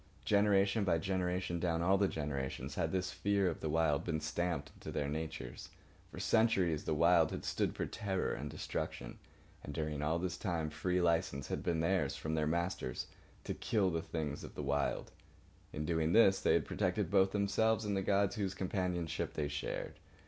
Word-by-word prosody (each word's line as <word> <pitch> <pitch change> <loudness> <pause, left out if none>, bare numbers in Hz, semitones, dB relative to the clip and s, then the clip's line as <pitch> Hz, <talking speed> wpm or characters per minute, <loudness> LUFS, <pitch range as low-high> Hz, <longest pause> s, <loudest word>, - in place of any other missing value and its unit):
Generation 100 0 +3
by 90 -4 +3
generation, 90 0 -1
down 85 -1 0
all 95 +3 +4
the 100 0 +3
generations, 75 -5 -3
had - - -1
this 95 -1 -1
fear 100 -1 +1
of 85 - -2
the 80 - -3
Wild 80 -1 +2
been 80 -3 -1
stamped 85 +3 -2
into - - -9
their 70 - -1
natures. 80 -4 -5 0.4
For - - -9
centuries 95 -9 +2
the 80 - 0
Wild 85 0 +5
had - - -5
stood - - 0
for - - -1
terror 95 -4 -2
and - - -4
destruction. - - -5 0.4
And 70 - -7
during 75 -2 -2
all 80 +3 +1
this 90 +1 -2
time 85 -6 -2
free 90 +4 0
licence 80 -5 +1
had - - -2
been 85 -2 0
theirs, 85 -5 +1
from 80 - -3
their 75 -1 +1
masters, 85 -6 -1 0.4
to - - -3
kill 105 -5 +1
the 80 0 -1
things 75 -3 -4
of - - -9
the 75 - -4
Wild. 70 0 -1 0.6
In 75 - -3
doing 80 0 +1
this 100 -4 +6
they - - +4
had - - +2
protected - - -1
both 95 -1 +4
themselves 105 +2 +2
and 100 -1 0
the 95 - +1
gods 100 +2 +2
whose 95 -3 -1
companionship 90 -3 -2
they 75 -1 0
shared. 70 +1 -4
85 Hz, 185 wpm, -35 LUFS, 80-95 Hz, 0.6 s, this